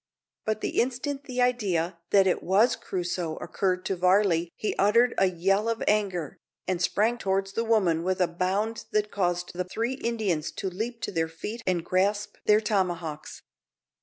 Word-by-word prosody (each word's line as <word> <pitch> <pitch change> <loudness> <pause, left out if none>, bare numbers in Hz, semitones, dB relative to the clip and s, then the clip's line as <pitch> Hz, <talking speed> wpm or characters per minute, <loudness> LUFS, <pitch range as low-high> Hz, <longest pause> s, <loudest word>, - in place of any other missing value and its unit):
But 215 0 -1
the - - +1
instant 265 +3 -3
the 250 -1 0
idea 185 -9 0
that 195 -1 +5
it 185 - +1
was 200 +7 +3
Crusoe 175 -3 -3
occurred 185 -1 -2
to 195 - 0
Varley 180 -2 +3
he 215 - -2
uttered 230 +5 +4
a 195 - +5
yell 195 +5 +1
of 230 -1 -1
anger, 190 -7 0 0.3
and 185 -2 -1
sprang 225 +6 +1
towards 195 0 -1
the 230 - 0
woman 195 -8 +2
with 185 +1 0
a 180 - +3
bound 195 +6 -1
that 210 0 0
caused 175 -2 -1
the 180 +1 -2
three 225 +7 -2
Indians 220 - -1
to 190 - -4
leap 230 +5 -4
to - - -3
their 165 -3 0
feet 210 +8 -6
and 175 -2 0
grasp 200 +3 0
their 210 0 +6
tomahawks. 175 -8 -2
195 Hz, 170 wpm, -27 LUFS, 175-220 Hz, 0.3 s, their